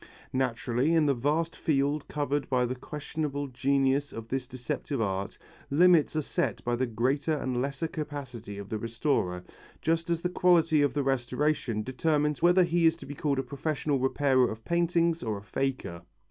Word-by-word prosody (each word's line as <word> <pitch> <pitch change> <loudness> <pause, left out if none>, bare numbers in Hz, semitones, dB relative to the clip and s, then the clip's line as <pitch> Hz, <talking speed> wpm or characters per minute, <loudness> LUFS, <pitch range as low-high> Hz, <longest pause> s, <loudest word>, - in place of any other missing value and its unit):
Naturally 130 +3 +1
in 160 -2 +4
the 140 - +3
vast 150 +6 0
field 145 0 0
covered 145 -1 -2
by 125 -1 +2
the 125 - -2
questionable 145 +2 -4
genius 135 +1 +1
of 115 0 -8
this 130 -1 -2
deceptive 130 +2 -4
art, 100 -2 -2 0.3
limits 165 +1 +4
are 155 - 0
set - - -2
by 120 0 0
the 130 +1 0
greater 135 +7 0
or - - -4
lesser 135 +5 -1
capacity 140 - -6
of 100 -1 -7
the 110 - -2
restorer, 115 -6 -1 0.4
just 165 +1 0
as 170 -1 0
the - - +2
quality 175 -4 +4
of 145 0 +1
the 145 - +1
restoration 130 -2 0
determines 150 +3 0
whether 175 +2 +6
he 170 -1 +3
is 160 - +3
to 165 - -11
be 145 - -7
called 140 -1 -1
a 135 - 0
professional 140 +2 -2
repairer 130 -1 +3
of 110 0 -8
paintings 170 -1 +1
or 110 -3 -2
a 100 - -10
faker. 125 -6 -3
140 Hz, 175 wpm, -28 LUFS, 125-155 Hz, 0.4 s, whether